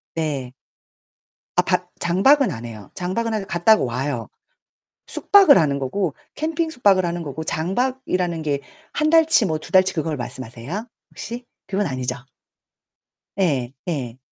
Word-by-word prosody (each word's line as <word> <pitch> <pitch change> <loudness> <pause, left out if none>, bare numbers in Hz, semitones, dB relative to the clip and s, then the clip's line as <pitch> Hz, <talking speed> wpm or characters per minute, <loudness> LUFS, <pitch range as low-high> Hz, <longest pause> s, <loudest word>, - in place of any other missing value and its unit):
네. 140 -6 -2 1.0
아 - - +5
바 - - 0
장박은 250 +11 +4
안 115 0 -6
해요. 110 -3 -10
장박은 220 +6 -2
하 205 -2 -2
갔다가 195 +4 +3
와요. 125 -1 -2 0.8
숙박을 390 -8 +6
하는 140 -3 +2
거고 145 +4 -2 0.2
캠핑 320 +1 -1
숙박을 200 - +3
하는 170 0 -3
거고 160 +1 -5
장박이라는 185 -2 -1
게 145 -2 -1 0.3
1 305 +1 +1
달치 325 -6 +5
뭐 155 -2 -1
2 - - -12
달치 190 0 +5
그걸 155 -2 -1
말씀하세요? 130 - -6 0.2
혹시? 235 +3 -7 0.2
그건 195 0 -1
아니죠? 130 -3 -2 1.2
예. 135 -9 +1 0.2
예. 130 -6 -3
175 Hz, 255 characters per minute, -22 LUFS, 140-220 Hz, 1.2 s, 숙박을